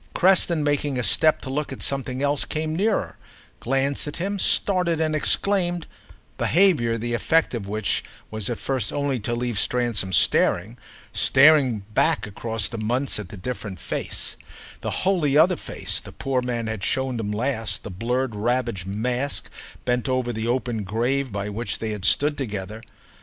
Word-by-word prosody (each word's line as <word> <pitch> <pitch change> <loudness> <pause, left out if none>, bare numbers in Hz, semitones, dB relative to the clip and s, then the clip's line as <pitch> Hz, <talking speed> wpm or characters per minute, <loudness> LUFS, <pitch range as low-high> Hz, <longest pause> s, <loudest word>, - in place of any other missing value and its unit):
Creston, 180 -4 +3
making 145 -2 0
a 125 - -1
step 155 +6 +3
to 130 - -7
look 150 +1 -2
at 135 - -4
something 135 -1 -2
else, 145 0 +2
came 155 0 -3
nearer, 205 +4 0 0.4
glanced 135 +3 0
at 145 - -5
him, 195 +3 -2
started 180 -4 +3
and 155 -1 +1
exclaimed—behaviour 175 - +1
the 120 +1 -3
effect 160 +7 +2
of 110 -5 -4
which 105 0 -1 0.3
was 110 -1 -2
at 120 - -2
first 135 -2 -2
only 140 -3 -1
to 120 +3 -2
leave 120 -3 -2
Stransom 120 -6 0
staring, 90 +4 +3 0.4
staring 135 -7 +5
back - - +2
across 110 +1 -3
the 115 - -6
months 125 +4 0
at 100 -4 -7
the 105 - -9
different 100 -3 -5
face, - - -3 0.4
the - - -4 0.2
wholly 160 -7 +2
other 180 +4 +5
face, - - -4
the - - -11
poor 135 -2 -1
man 120 -2 -2
had 110 -2 -4
shown 130 -2 0
him 105 -2 -2
last, 115 0 -1
the 105 - -7
blurred 120 +5 -1
ravaged 115 -3 -1
mask 125 +7 -2 0.3
bent 125 +1 0
over 130 -2 0
the 110 +1 -3
open 120 -2 -1
grave 120 +6 -1
by 100 0 -3
which 105 +1 -3
they 110 -1 -3
had 105 -3 -4
stood 145 - +4
together. 105 -3 -5
125 Hz, 165 wpm, -24 LUFS, 110-145 Hz, 0.4 s, staring